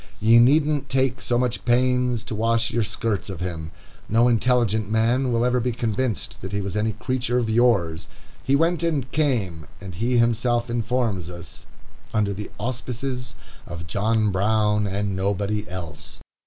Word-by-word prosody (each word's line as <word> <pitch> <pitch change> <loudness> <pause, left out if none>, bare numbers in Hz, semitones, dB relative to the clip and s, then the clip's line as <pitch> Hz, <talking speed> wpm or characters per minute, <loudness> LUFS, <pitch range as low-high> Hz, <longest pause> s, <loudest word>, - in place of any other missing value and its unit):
Ye 115 +2 +6
needn't 145 +3 +3
take 130 -1 0
so 120 - 0
much 125 -1 -1
pains 125 -1 +2
to - - -6
wash 115 +1 +1
your 120 - 0
skirts 105 0 -2
of 95 - -6
him. 85 -3 -4 0.4
No 115 +3 +4
intelligent 115 -3 +2
man 120 +4 +2
will 120 0 +2
ever 125 0 +2
be 125 0 -1
convinced 115 0 -2
that - - -6
he 100 - 0
was 100 0 -4
any 110 +1 0
creature 125 +2 -1
of 115 -3 0
yours. 100 -9 +2 0.4
He 135 - +2
went 165 +4 +2
and 150 -7 -1
came, 110 - -1
as 95 0 -8
he 120 +7 0
himself 120 +1 +1
informs 115 -6 -1
us, 85 -2 -9 0.5
"under 105 -2 +1
the 105 +2 -6
auspices 125 -1 -4 0.3
of 85 0 -7
John 105 +4 +1
Brown 105 +1 +2
and 100 0 -2
nobody 100 +2 -1
else." 85 -5 -8
115 Hz, 160 wpm, -23 LUFS, 100-125 Hz, 0.5 s, Ye